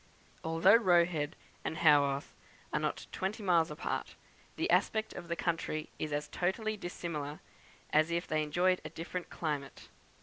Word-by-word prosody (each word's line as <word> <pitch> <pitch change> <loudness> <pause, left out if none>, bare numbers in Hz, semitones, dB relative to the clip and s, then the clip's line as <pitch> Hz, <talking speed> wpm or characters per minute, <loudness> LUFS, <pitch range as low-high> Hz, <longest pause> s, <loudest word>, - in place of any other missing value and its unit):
Although 165 +6 +6
Roe 175 -6 +5
Head 155 -4 -3 0.3
and 160 - -3
Haworth 145 -3 +4 0.4
are - - +2
not - - -2
twenty 200 +3 -3
miles 170 -4 +4
apart, 150 +1 -3 0.4
the - - 0
aspect 220 0 +2
of 175 - -8
the 170 - -1
country 165 -3 -2
is 155 - -2
as 145 0 -1
totally 215 +5 -1
dissimilar 165 -6 -5 0.5
as 155 +2 +4
if 170 +1 -1
they 155 0 0
enjoyed 175 +5 +2
a - - -6
different 175 +2 -5
climate. 145 -4 -4
170 Hz, 155 wpm, -33 LUFS, 150-180 Hz, 0.5 s, Although